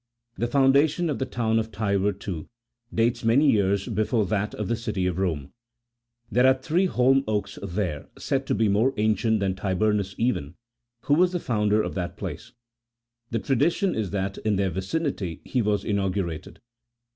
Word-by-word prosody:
The 120 Hz, -, -1 dB
foundation 140 Hz, +6 st, +3 dB
of -, -, -3 dB
the 130 Hz, -, -1 dB
town 115 Hz, -2 st, 0 dB
of 110 Hz, 0 st, -4 dB
Tibur, 100 Hz, -1 st, +1 dB
too, 95 Hz, -5 st, -6 dB, 0.4 s
dates 115 Hz, +2 st, +1 dB
many 135 Hz, +6 st, +4 dB
years 100 Hz, -1 st, +1 dB
before 110 Hz, 0 st, +1 dB
that 105 Hz, +1 st, -1 dB
of 105 Hz, -, -3 dB
the 115 Hz, -, 0 dB
City 110 Hz, -5 st, -2 dB
of 90 Hz, 0 st, -1 dB
Rome: 80 Hz, -8 st, -2 dB, 0.8 s
there 125 Hz, +2 st, +4 dB
are 130 Hz, -, +6 dB
three 160 Hz, +8 st, +1 dB
holm 135 Hz, -2 st, +3 dB
oaks 105 Hz, -2 st, -2 dB
there, 90 Hz, -6 st, -3 dB
said -, -, -2 dB
to -, -, +1 dB
be 110 Hz, 0 st, +2 dB
more 110 Hz, +7 st, +2 dB
ancient 110 Hz, 0 st, +1 dB
than 95 Hz, -1 st, +1 dB
Tiburnus 100 Hz, +1 st, 0 dB
even, 90 Hz, -, -1 dB, 0.5 s
who 145 Hz, -, +1 dB
was 180 Hz, +4 st, +4 dB
the 180 Hz, -, 0 dB
founder 105 Hz, -5 st, +1 dB
of -, -, -4 dB
that 90 Hz, -2 st, -4 dB
place; -, -, -6 dB, 0.8 s
the 115 Hz, -, -1 dB
tradition 145 Hz, -, +1 dB
is 110 Hz, -4 st, -2 dB
that 95 Hz, 0 st, -3 dB
in 110 Hz, -1 st, 0 dB
their 95 Hz, -1 st, 0 dB
vicinity 95 Hz, -, -3 dB
he 125 Hz, -, 0 dB
was 105 Hz, -1 st, 0 dB
inau 100 Hz, -2 st, 0 dB
gurated. 85 Hz, -4 st, -4 dB
105 Hz, 175 wpm, -25 LUFS, 95-125 Hz, 0.8 s, are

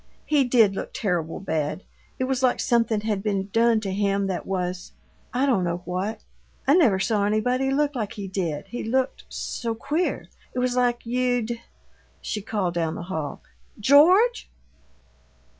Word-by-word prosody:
"He 295 Hz, -2 st, +3 dB
did 235 Hz, -5 st, +4 dB
look -, -, -6 dB
terrible 175 Hz, -6 st, -1 dB
bad. 160 Hz, -1 st, -2 dB, 0.3 s
It -, -, -1 dB
was 260 Hz, 0 st, 0 dB
like 255 Hz, -1 st, +2 dB
something 230 Hz, -3 st, +2 dB
had 210 Hz, -2 st, -1 dB
been 200 Hz, -2 st, -1 dB
done 230 Hz, 0 st, +4 dB
to 195 Hz, -3 st, -3 dB
him 200 Hz, 0 st, +1 dB
that 190 Hz, -2 st, -3 dB
was 180 Hz, -1 st, -3 dB, 0.4 s
I 255 Hz, +3 st, +1 dB
don't 240 Hz, -10 st, +2 dB
know 175 Hz, 0 st, -2 dB
what. 190 Hz, +5 st, -3 dB, 0.4 s
I 275 Hz, -, +5 dB
never 280 Hz, -, +5 dB
saw 200 Hz, +2 st, +1 dB
anybody 250 Hz, +6 st, +1 dB
look 290 Hz, +2 st, +1 dB
like 220 Hz, -6 st, -3 dB
he 200 Hz, -2 st, -6 dB
did. 175 Hz, -6 st, -3 dB
He 240 Hz, -, -4 dB
looked 260 Hz, +4 st, -1 dB
so 230 Hz, -2 st, -3 dB
queer. 305 Hz, +9 st, -1 dB, 0.3 s
It -, -, -4 dB
was 250 Hz, 0 st, +1 dB
like 245 Hz, -1 st, +1 dB
you'd 245 Hz, -1 st, 0 dB, 0.3 s
" -, -, -35 dB
She 210 Hz, -, -4 dB
called 195 Hz, -4 st, -2 dB
down 165 Hz, -2 st, -1 dB
the -, -, -6 dB
hall, 150 Hz, -4 st, -4 dB, 0.4 s
"George!" 350 Hz, -, +5 dB
220 Hz, 165 wpm, -25 LUFS, 190-250 Hz, 0.4 s, I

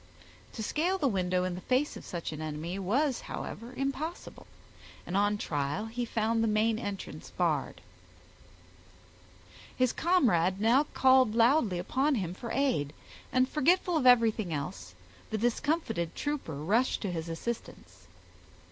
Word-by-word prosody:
To 220 Hz, -, -5 dB
scale 345 Hz, -, 0 dB
the 300 Hz, -7 st, +1 dB
window 180 Hz, -4 st, 0 dB
in 185 Hz, -1 st, -2 dB
the 180 Hz, -, -6 dB
face 260 Hz, +7 st, 0 dB
of -, -, -9 dB
such 170 Hz, -2 st, -5 dB
an 155 Hz, 0 st, -6 dB
enemy, 155 Hz, +4 st, -4 dB
was, 250 Hz, +8 st, 0 dB
however, 235 Hz, +2 st, -6 dB
impossible, 275 Hz, +5 st, -4 dB, 0.6 s
and 175 Hz, -, -4 dB
on 205 Hz, +1 st, +2 dB
trial 145 Hz, +3 st, -2 dB
he 240 Hz, +2 st, -3 dB
found 225 Hz, 0 st, 0 dB
the -, -, +2 dB
main 215 Hz, +1 st, +2 dB
entrance 195 Hz, -8 st, -6 dB
barred. 150 Hz, -, -1 dB, 2.0 s
His 255 Hz, -2 st, +2 dB
comrade 195 Hz, -, +2 dB
now 240 Hz, +7 st, +4 dB
called 260 Hz, -4 st, +5 dB
loudly 230 Hz, -, +3 dB
upon 270 Hz, +11 st, +1 dB
him 180 Hz, -6 st, -2 dB
for 235 Hz, +5 st, -7 dB
aid, 195 Hz, -, 0 dB, 0.4 s
and 255 Hz, 0 st, +3 dB
forgetful 345 Hz, +5 st, +2 dB
of 280 Hz, -5 st, +2 dB
everything 225 Hz, -6 st, +4 dB
else, 90 Hz, -, -5 dB, 0.3 s
the 220 Hz, -, -1 dB
discomfited 235 Hz, -, -1 dB
trooper 290 Hz, -, -3 dB
rushed 205 Hz, -, +1 dB
to 200 Hz, -, -2 dB
his 165 Hz, -1 st, -4 dB
assistance. 230 Hz, +8 st, -6 dB
220 Hz, 140 wpm, -30 LUFS, 175-260 Hz, 2.0 s, called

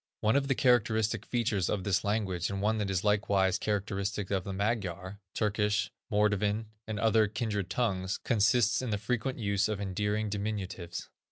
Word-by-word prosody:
One 110 Hz, +4 st, +3 dB
of 140 Hz, -1 st, +2 dB
the 135 Hz, -, +2 dB
characteristic 110 Hz, -3 st, +2 dB
features 105 Hz, -7 st, 0 dB
of 100 Hz, -3 st, -1 dB
this 95 Hz, -2 st, +1 dB
language, 100 Hz, -5 st, -1 dB
and 100 Hz, -, -3 dB
one 110 Hz, +2 st, +1 dB
that 105 Hz, -2 st, -1 dB
is 95 Hz, -2 st, 0 dB
likewise 100 Hz, -2 st, +2 dB
characteristic 100 Hz, -1 st, -2 dB
of 95 Hz, -2 st, +1 dB
the 100 Hz, -, -4 dB
Magyar, 100 Hz, -2 st, -2 dB, 0.2 s
Turkish, 105 Hz, 0 st, +1 dB, 0.2 s
Mordvin, 105 Hz, +1 st, +2 dB, 0.2 s
and 110 Hz, -1 st, -3 dB
other 110 Hz, -1 st, +4 dB
kindred 105 Hz, -3 st, -2 dB
tongues, 95 Hz, -5 st, 0 dB
consists 115 Hz, 0 st, +2 dB
in 130 Hz, -, -3 dB
the 105 Hz, -, 0 dB
frequent 125 Hz, +5 st, -2 dB
use 100 Hz, -2 st, +1 dB
of 105 Hz, -2 st, -2 dB
endearing 105 Hz, +2 st, -1 dB
diminutives. 100 Hz, -4 st, -4 dB
105 Hz, 165 wpm, -30 LUFS, 100-110 Hz, 0.2 s, other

